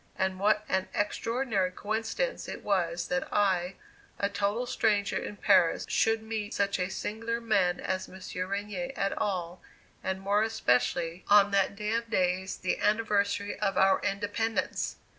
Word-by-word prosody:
And 190 Hz, 0 st, -1 dB
what 210 Hz, +1 st, +2 dB
an 190 Hz, 0 st, 0 dB
extraordinary 215 Hz, -2 st, 0 dB
coincidence 220 Hz, -, -2 dB
it -, -, -7 dB
was 175 Hz, -4 st, 0 dB
that 180 Hz, -, -1 dB
I, 190 Hz, -3 st, +1 dB, 0.4 s
a 200 Hz, -, 0 dB
total 205 Hz, +4 st, -1 dB
stranger 210 Hz, -4 st, +1 dB
in 205 Hz, -, -3 dB
Paris, 190 Hz, -6 st, +4 dB
should 225 Hz, 0 st, +2 dB
meet 220 Hz, -1 st, -4 dB
such 200 Hz, -1 st, +1 dB
a 180 Hz, +1 st, 0 dB
singular 230 Hz, +4 st, -3 dB
man 195 Hz, -6 st, +1 dB
as 185 Hz, 0 st, -3 dB
M. 190 Hz, -, -11 dB, 0.3 s
Regnier 210 Hz, +7 st, -3 dB
at 195 Hz, 0 st, 0 dB
all, 180 Hz, -3 st, -2 dB, 0.4 s
and 190 Hz, 0 st, -2 dB
more 200 Hz, +2 st, +2 dB
especially 165 Hz, -, +1 dB
on 205 Hz, 0 st, +6 dB
that 200 Hz, 0 st, +2 dB
day 210 Hz, +2 st, -2 dB
of 230 Hz, 0 st, -1 dB
days, 185 Hz, -2 st, 0 dB
the 185 Hz, -, -1 dB
anniversary 205 Hz, -1 st, +1 dB
of 195 Hz, -2 st, 0 dB
our 190 Hz, 0 st, +5 dB
Independence! 205 Hz, +3 st, -1 dB
200 Hz, 150 wpm, -29 LUFS, 190-215 Hz, 0.4 s, on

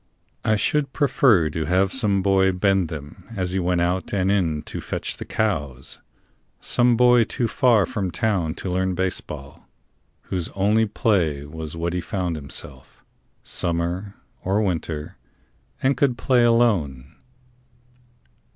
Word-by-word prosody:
I 110 Hz, -, +2 dB
should 140 Hz, +6 st, 0 dB
prefer 120 Hz, -, +3 dB
to 80 Hz, +1 st, -2 dB
have 95 Hz, +3 st, +2 dB
some 100 Hz, -7 st, +2 dB
boy 95 Hz, -1 st, +3 dB
bend 95 Hz, -1 st, +2 dB
them 80 Hz, +3 st, -8 dB
As 90 Hz, -2 st, -2 dB
he 95 Hz, -, 0 dB
went 90 Hz, -1 st, +1 dB
out 90 Hz, +2 st, -1 dB
and 95 Hz, 0 st, +2 dB
in 80 Hz, -7 st, 0 dB
to -, -, -5 dB
fetch -, -, -4 dB
the -, -, -7 dB
cows 75 Hz, -, -2 dB, 0.6 s
Some 120 Hz, -1 st, +2 dB
boy 125 Hz, 0 st, +6 dB
too 120 Hz, +2 st, -1 dB
far 120 Hz, -5 st, +3 dB
from 105 Hz, -7 st, -3 dB
town 90 Hz, -3 st, -1 dB
to 95 Hz, -, -4 dB
learn 95 Hz, 0 st, 0 dB
baseball, 75 Hz, -6 st, -4 dB, 0.6 s
Whose 90 Hz, -3 st, -3 dB
only 105 Hz, +3 st, +2 dB
play 85 Hz, -10 st, 0 dB
was 80 Hz, +1 st, -7 dB
what 85 Hz, +1 st, -2 dB
he 90 Hz, -, -1 dB
found 90 Hz, -3 st, -2 dB
himself, 70 Hz, -2 st, -8 dB, 0.4 s
Summer 85 Hz, +4 st, -2 dB, 0.3 s
or 100 Hz, +3 st, +1 dB
winter, 80 Hz, -5 st, -3 dB, 0.7 s
and 135 Hz, +1 st, +3 dB
could 130 Hz, -4 st, +1 dB
play 125 Hz, +2 st, +3 dB
alone. 90 Hz, -, +1 dB
95 Hz, 140 wpm, -23 LUFS, 80-110 Hz, 0.7 s, boy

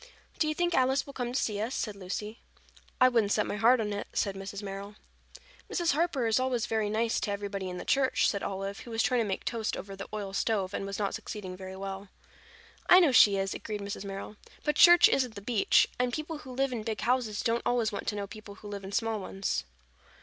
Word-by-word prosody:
"Do 310 Hz, -, +2 dB
you 310 Hz, -, -1 dB
think 350 Hz, +1 st, 0 dB
Alice 260 Hz, +2 st, +2 dB
will 280 Hz, -, -10 dB
come 245 Hz, -2 st, -3 dB
to 255 Hz, -, 0 dB
see 210 Hz, -2 st, -1 dB
us?" 235 Hz, +2 st, -2 dB
asked 210 Hz, -, -7 dB
Lucy. 205 Hz, +3 st, -5 dB, 0.6 s
"I 255 Hz, -, +7 dB
wouldn't 230 Hz, -5 st, +2 dB
set 210 Hz, -, +2 dB
my -, -, -3 dB
heart 235 Hz, +4 st, +5 dB
on 210 Hz, -2 st, -1 dB
it," 205 Hz, -, -4 dB
said 200 Hz, -, 0 dB
Mrs. 195 Hz, +1 st, -7 dB
Merrill. 200 Hz, +1 st, -6 dB, 0.8 s
"Mrs. 345 Hz, -2 st, +1 dB
Harper 295 Hz, -4 st, +1 dB
is 225 Hz, +1 st, +3 dB
always 255 Hz, -3 st, 0 dB
very 220 Hz, -2 st, 0 dB
nice 225 Hz, +2 st, +1 dB
to 205 Hz, -, -2 dB
everybody 200 Hz, -2 st, -4 dB
in 180 Hz, -, -5 dB
the -, -, -7 dB
church," 270 Hz, -1 st, +2 dB
said 200 Hz, -, -1 dB
Olive, 195 Hz, 0 st, -4 dB
who -, -, -10 dB
was 225 Hz, 0 st, 0 dB
trying 250 Hz, -2 st, +2 dB
to 220 Hz, -, -1 dB
make 190 Hz, -, -3 dB
toast 225 Hz, -2 st, -2 dB
over 195 Hz, 0 st, -7 dB
the 195 Hz, -, -7 dB
oil 205 Hz, -2 st, -5 dB
stove 195 Hz, -2 st, 0 dB
and 195 Hz, -, -3 dB
was 200 Hz, 0 st, -4 dB
not 200 Hz, -2 st, -1 dB
succeeding 190 Hz, -3 st, -6 dB
very 190 Hz, 0 st, -8 dB
well. 195 Hz, 0 st, -6 dB, 0.8 s
"I 360 Hz, -, +10 dB
know 335 Hz, -6 st, +5 dB
she 205 Hz, -5 st, +7 dB
is," 195 Hz, 0 st, -1 dB
agreed 210 Hz, -2 st, -5 dB
Mrs. 200 Hz, 0 st, -5 dB
Merrill. 200 Hz, +1 st, -7 dB, 0.3 s
"But 300 Hz, -1 st, 0 dB
church 345 Hz, +2 st, +8 dB
isn't 250 Hz, -4 st, 0 dB
the -, -, -6 dB
beach, 215 Hz, 0 st, +3 dB
and 250 Hz, 0 st, +1 dB
people 310 Hz, +2 st, -4 dB
who 265 Hz, -4 st, -10 dB
live 270 Hz, +1 st, 0 dB
in 230 Hz, -, -3 dB
big 215 Hz, -1 st, -4 dB
houses 240 Hz, -4 st, 0 dB
don't 230 Hz, +1 st, +1 dB
always 235 Hz, -3 st, +1 dB
want 200 Hz, -, -5 dB
to 210 Hz, -, 0 dB
know 205 Hz, -1 st, -3 dB
people 205 Hz, 0 st, -11 dB
who 210 Hz, -1 st, -11 dB
live 200 Hz, -1 st, -6 dB
in 190 Hz, -, -7 dB
small 225 Hz, +1 st, 0 dB
ones." 195 Hz, 0 st, -3 dB
215 Hz, 235 wpm, -29 LUFS, 200-250 Hz, 0.8 s, I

